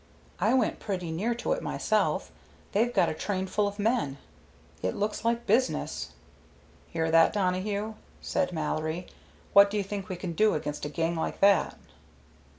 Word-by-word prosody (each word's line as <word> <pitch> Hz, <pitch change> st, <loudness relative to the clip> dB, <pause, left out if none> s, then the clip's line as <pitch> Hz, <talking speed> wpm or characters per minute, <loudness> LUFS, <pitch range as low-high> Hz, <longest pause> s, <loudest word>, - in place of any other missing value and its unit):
I -, -, +3 dB
went 250 Hz, -4 st, +1 dB
pretty 180 Hz, -5 st, -3 dB
near 215 Hz, +9 st, -1 dB
to 235 Hz, -, -3 dB
it -, -, 0 dB
myself. -, -, 0 dB, 0.4 s
They've 230 Hz, +4 st, +2 dB
got -, -, +3 dB
a -, -, -2 dB
train 190 Hz, +3 st, -2 dB
full 205 Hz, +2 st, 0 dB
of 200 Hz, 0 st, -5 dB
men. 205 Hz, -, 0 dB, 0.6 s
It 95 Hz, -, -1 dB
looks 210 Hz, +1 st, -2 dB
like 235 Hz, +1 st, 0 dB
business." 245 Hz, +5 st, 0 dB, 0.7 s
"Hear 160 Hz, -1 st, -1 dB
that, 165 Hz, 0 st, +5 dB
Donohue?" 200 Hz, +2 st, -1 dB, 0.3 s
said 280 Hz, -6 st, -1 dB
Mallory. 155 Hz, +1 st, -2 dB, 0.5 s
"What 200 Hz, 0 st, +8 dB
do 210 Hz, -, -2 dB
you 205 Hz, -, +1 dB
think 195 Hz, -1 st, -5 dB
we 185 Hz, -, -3 dB
can 175 Hz, -1 st, -5 dB
do 215 Hz, +5 st, +3 dB
against 150 Hz, -1 st, -3 dB
a -, -, -3 dB
gang 165 Hz, +3 st, -1 dB
like 160 Hz, -, -3 dB
that?" 200 Hz, 0 st, +4 dB
200 Hz, 165 wpm, -28 LUFS, 165-215 Hz, 0.7 s, What